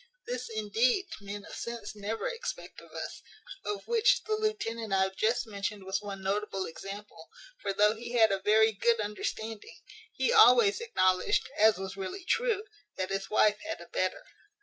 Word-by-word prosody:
This, 250 Hz, 0 st, -4 dB
indeed, 225 Hz, -, +1 dB, 0.2 s
men 200 Hz, 0 st, -7 dB
of -, -, -11 dB
sense 235 Hz, -3 st, -6 dB
never 210 Hz, -, -3 dB
expect -, -, -6 dB
of -, -, -17 dB
us; -, -, -6 dB, 0.4 s
of 205 Hz, -1 st, -4 dB
which 465 Hz, +1 st, +3 dB
the 435 Hz, -, -2 dB
lieutenant 410 Hz, -, -2 dB
I 190 Hz, 0 st, +4 dB
have 190 Hz, 0 st, -2 dB
just 225 Hz, +5 st, +1 dB
mentioned 200 Hz, -1 st, -4 dB
was 190 Hz, +1 st, -2 dB
one 200 Hz, -2 st, -7 dB
notable 195 Hz, -1 st, -1 dB
example; 200 Hz, +5 st, -9 dB, 0.3 s
for -, -, -1 dB
though 210 Hz, +2 st, +4 dB
he 235 Hz, +2 st, -7 dB
had 225 Hz, -3 st, +5 dB
a 195 Hz, -, +1 dB
very 220 Hz, +3 st, +4 dB
good 230 Hz, +2 st, +2 dB
understanding, 215 Hz, +1 st, -4 dB, 0.3 s
he 480 Hz, -, +1 dB
always 435 Hz, -1 st, +7 dB
acknowledged 185 Hz, -, +2 dB
(as 215 Hz, -1 st, +5 dB
was 190 Hz, 0 st, -6 dB
really 195 Hz, -, -5 dB
true) 455 Hz, 0 st, +1 dB, 0.3 s
that 185 Hz, +1 st, -3 dB
his 195 Hz, 0 st, -2 dB
wife 210 Hz, -1 st, +4 dB
had 325 Hz, +1 st, -5 dB
a -, -, -12 dB
better. -, -, -1 dB
215 Hz, 170 wpm, -30 LUFS, 200-250 Hz, 0.4 s, always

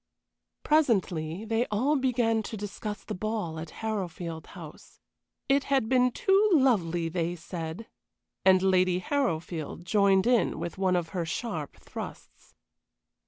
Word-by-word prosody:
Presently 195 Hz, -, +1 dB
they 225 Hz, +2 st, 0 dB
all 255 Hz, +9 st, +1 dB
began 240 Hz, -4 st, +1 dB
to 220 Hz, +1 st, -6 dB
discuss 205 Hz, +1 st, -6 dB
the -, -, -5 dB
ball 205 Hz, -5 st, -3 dB
at 160 Hz, 0 st, -6 dB, 0.2 s
Harrowfield 175 Hz, -6 st, -4 dB
House. -, -, -12 dB, 0.5 s
It 275 Hz, 0 st, +3 dB
had 270 Hz, -5 st, +1 dB
been 250 Hz, -1 st, +4 dB
too 390 Hz, -, +3 dB
lovely, 180 Hz, -, +3 dB
they 170 Hz, +1 st, -2 dB
said, 165 Hz, +3 st, -6 dB, 0.6 s
and 190 Hz, -1 st, +5 dB
Lady 185 Hz, -1 st, +3 dB
Harrowfield 175 Hz, -, -2 dB
joined 195 Hz, +1 st, +3 dB
in 245 Hz, -1 st, +2 dB
with 175 Hz, +2 st, -5 dB
one 185 Hz, -1 st, +2 dB
of 170 Hz, -2 st, -1 dB
her 175 Hz, 0 st, -2 dB
sharp 165 Hz, -2 st, -4 dB
thrusts. -, -, -10 dB
195 Hz, 130 wpm, -28 LUFS, 170-235 Hz, 0.6 s, and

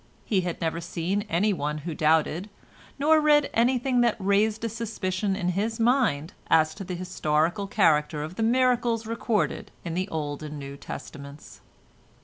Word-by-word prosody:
He 195 Hz, -4 st, +1 dB
had 175 Hz, -2 st, -4 dB
never 165 Hz, 0 st, -2 dB
seen 175 Hz, +4 st, -2 dB
anyone 170 Hz, -5 st, 0 dB
who 170 Hz, -, -3 dB
doubted, 160 Hz, +5 st, +1 dB, 0.5 s
nor 310 Hz, +2 st, +4 dB
read 295 Hz, -1 st, +4 dB
anything 250 Hz, +1 st, +2 dB
that 235 Hz, -2 st, +3 dB
raised 210 Hz, +2 st, +1 dB
a -, -, +1 dB
suspicion 205 Hz, -4 st, -2 dB
in 180 Hz, -3 st, -1 dB
his 215 Hz, +5 st, -1 dB
mind 225 Hz, -, +2 dB
as 155 Hz, -1 st, +4 dB
to 195 Hz, -, -7 dB
the 180 Hz, -1 st, -5 dB
historical 175 Hz, +1 st, 0 dB
character 150 Hz, -6 st, +2 dB
of 155 Hz, +3 st, -6 dB
the 205 Hz, -, -5 dB
miracles 240 Hz, -1 st, +2 dB
recorded 230 Hz, -1 st, -1 dB, 0.2 s
in 170 Hz, -, -3 dB
the 185 Hz, +3 st, -2 dB
Old 145 Hz, -2 st, -4 dB
and 150 Hz, -1 st, -6 dB
New 140 Hz, -1 st, -7 dB
Testaments. 140 Hz, 0 st, -10 dB
190 Hz, 155 wpm, -26 LUFS, 160-230 Hz, 0.5 s, nor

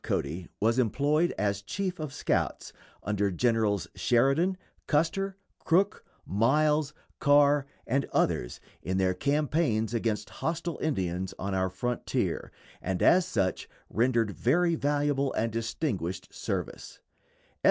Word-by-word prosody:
Cody 80 Hz, +5 st, -2 dB
was 115 Hz, +4 st, +2 dB
employed 145 Hz, +8 st, +2 dB
as 100 Hz, 0 st, 0 dB
chief 185 Hz, -, -3 dB
of 155 Hz, -3 st, -4 dB
scouts -, -, -1 dB, 0.3 s
under 100 Hz, 0 st, 0 dB
Generals 105 Hz, -2 st, +1 dB
Sheridan, 140 Hz, +10 st, +2 dB, 0.3 s
Custer, 190 Hz, +6 st, +1 dB, 0.2 s
Crook, 195 Hz, +5 st, +2 dB, 0.2 s
Miles, 150 Hz, +7 st, +2 dB, 0.2 s
Carr, 145 Hz, -1 st, +4 dB, 0.2 s
and 135 Hz, +3 st, +1 dB
others -, -, 0 dB, 0.2 s
in 95 Hz, +1 st, -2 dB
their 95 Hz, -1 st, +2 dB
campaigns 140 Hz, -, 0 dB
against 110 Hz, -2 st, -1 dB
hostile 165 Hz, 0 st, -2 dB
Indians 95 Hz, -, -2 dB
on 100 Hz, +1 st, -3 dB
our 95 Hz, 0 st, +1 dB
frontier, 120 Hz, +7 st, -2 dB, 0.3 s
and 90 Hz, 0 st, -1 dB
as 180 Hz, 0 st, +5 dB
such 100 Hz, -, -1 dB, 0.2 s
rendered 115 Hz, -1 st, +2 dB
very 170 Hz, -, +2 dB
valuable 145 Hz, -2 st, 0 dB
and 115 Hz, +1 st, 0 dB
distinguished 110 Hz, -, -3 dB
service. -, -, -5 dB
125 Hz, 115 wpm, -28 LUFS, 100-150 Hz, 0.3 s, as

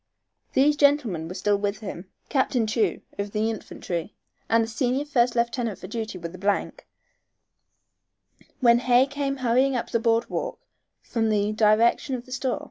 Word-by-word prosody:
These 290 Hz, +3 st, +4 dB
gentlemen 265 Hz, -, +2 dB
were 180 Hz, -, -7 dB
still 205 Hz, +1 st, +1 dB
with 200 Hz, +1 st, -2 dB
him, 190 Hz, -3 st, -7 dB, 0.2 s
Captain 260 Hz, -4 st, +1 dB
Chew, 215 Hz, +1 st, 0 dB, 0.2 s
of 200 Hz, 0 st, -3 dB
the 220 Hz, +1 st, +1 dB
Infantry, 185 Hz, -3 st, -5 dB, 0.3 s
and 230 Hz, 0 st, +4 dB
the -, -, -3 dB
senior 255 Hz, +4 st, -1 dB
first 245 Hz, -4 st, +2 dB
lieutenant 235 Hz, -2 st, -1 dB
for -, -, -10 dB
duty 220 Hz, 0 st, -5 dB
with 170 Hz, -1 st, -6 dB
the 185 Hz, -, -11 dB
th, 200 Hz, +1 st, -1 dB, 1.8 s
when 235 Hz, -1 st, +6 dB
Hay 250 Hz, +1 st, +4 dB
came 280 Hz, 0 st, -3 dB
hurrying 260 Hz, +3 st, +3 dB
up 240 Hz, -, -3 dB
the 230 Hz, -, +2 dB
board 230 Hz, 0 st, +2 dB
walk -, -, -4 dB, 0.4 s
from 225 Hz, -2 st, -1 dB
the 210 Hz, 0 st, +1 dB
direction 220 Hz, +5 st, +3 dB
of 245 Hz, -1 st, -7 dB
the 255 Hz, -, -15 dB
store. 260 Hz, +1 st, -1 dB
230 Hz, 165 wpm, -25 LUFS, 205-255 Hz, 1.8 s, when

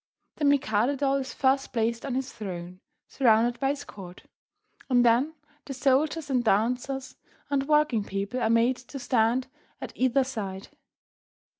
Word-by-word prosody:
The 300 Hz, -, -1 dB
Mikado 275 Hz, -2 st, +2 dB
doll 275 Hz, 0 st, +1 dB
is 265 Hz, -1 st, -4 dB
first 270 Hz, 0 st, +1 dB
placed 230 Hz, +2 st, -1 dB
on 260 Hz, -, -2 dB
his 265 Hz, 0 st, -3 dB
throne, 180 Hz, -3 st, -7 dB, 0.3 s
surrounded 240 Hz, -1 st, +2 dB
by 270 Hz, -, +1 dB
his 285 Hz, 0 st, -3 dB
court, 185 Hz, -3 st, -11 dB, 0.7 s
and 245 Hz, -1 st, +4 dB
then 250 Hz, +7 st, +3 dB, 0.3 s
the 275 Hz, -, -6 dB
soldiers 285 Hz, +4 st, +1 dB
and 255 Hz, -3 st, +1 dB
dancers 250 Hz, +5 st, 0 dB, 0.3 s
and 275 Hz, -1 st, 0 dB
working 300 Hz, -8 st, +3 dB
people 200 Hz, +5 st, -3 dB
are 220 Hz, -, +1 dB
made 230 Hz, +3 st, +3 dB
to 255 Hz, +3 st, -10 dB
stand 245 Hz, 0 st, +1 dB, 0.3 s
at -, -, -7 dB
either 260 Hz, +1 st, +2 dB
side. 200 Hz, -7 st, -6 dB
255 Hz, 150 wpm, -27 LUFS, 225-275 Hz, 0.7 s, and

